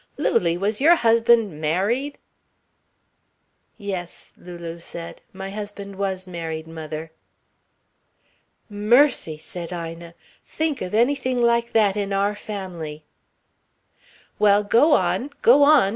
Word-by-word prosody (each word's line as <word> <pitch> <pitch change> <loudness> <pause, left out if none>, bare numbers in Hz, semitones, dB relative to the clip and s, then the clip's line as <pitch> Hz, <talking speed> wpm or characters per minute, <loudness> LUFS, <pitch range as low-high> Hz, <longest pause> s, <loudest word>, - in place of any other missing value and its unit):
"Lulie, 170 -1 +1
was 205 +5 -2
your 330 +4 +7
husband 230 - +3
married?" 210 - 0 1.6
"Yes," 190 -5 -6
Lulu 170 -1 -9
said, 170 0 -8
"my 190 0 -7
husband 205 -1 -7
was 190 -1 -3
married, 165 -3 -5
mother." 160 0 -7 1.6
"Mercy," 210 - +2
said 170 +2 -8
Ina. 170 -1 -7 0.3
"Think 315 -3 -2
of 180 - -3
anything 255 +1 +1
like 235 0 +2
that 210 -3 +3
in 200 -1 -2
our 200 +1 +1
family." 180 -8 -7 1.4
"Well, 205 0 +4
go 240 +9 +4
on 270 - +1
go 255 +5 +6
on!" 285 -8 +6
200 Hz, 110 wpm, -23 LUFS, 170-235 Hz, 1.6 s, your